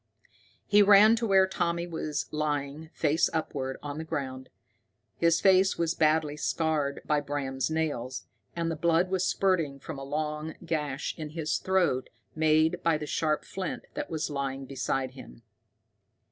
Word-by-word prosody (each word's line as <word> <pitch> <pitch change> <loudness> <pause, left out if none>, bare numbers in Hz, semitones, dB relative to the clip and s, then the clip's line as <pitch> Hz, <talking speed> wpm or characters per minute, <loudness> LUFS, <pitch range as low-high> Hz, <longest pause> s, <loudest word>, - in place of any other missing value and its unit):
He 210 0 +5
ran 205 +2 +7
to 230 0 -1
where 190 -1 +5
Jimmy 170 -2 -1
was 155 -3 -3
lying, 150 0 -2
face 160 +1 +2
upward, 135 -4 -3
on 145 +1 -5
the - - -3
ground. 130 -4 -5 0.7
His 170 0 +3
face 190 0 +4
was 170 -1 +1
badly 155 -2 +2
scarred 150 -2 -1
by 150 -1 +2
Bram's 135 -2 -2
nails, 145 -6 -2 0.3
and 165 -1 -1
the - - -2
blood 170 +3 +2
was 185 -1 +1
spurting 165 -8 +1
from 145 +1 -7
a - - -6
long 150 +2 -3
gash 150 -4 -2
in 155 -1 -5
his 155 -1 0
throat, 180 -9 +1 0.2
made 155 +2 +2
by 165 -2 +2
the 150 - -5
sharp 155 0 -1
flint 190 -2 -5
that - - -4
was 160 -2 -3
lying 135 -1 -3
beside 135 -1 -2
him. 95 - -13
155 Hz, 155 wpm, -28 LUFS, 140-170 Hz, 0.7 s, ran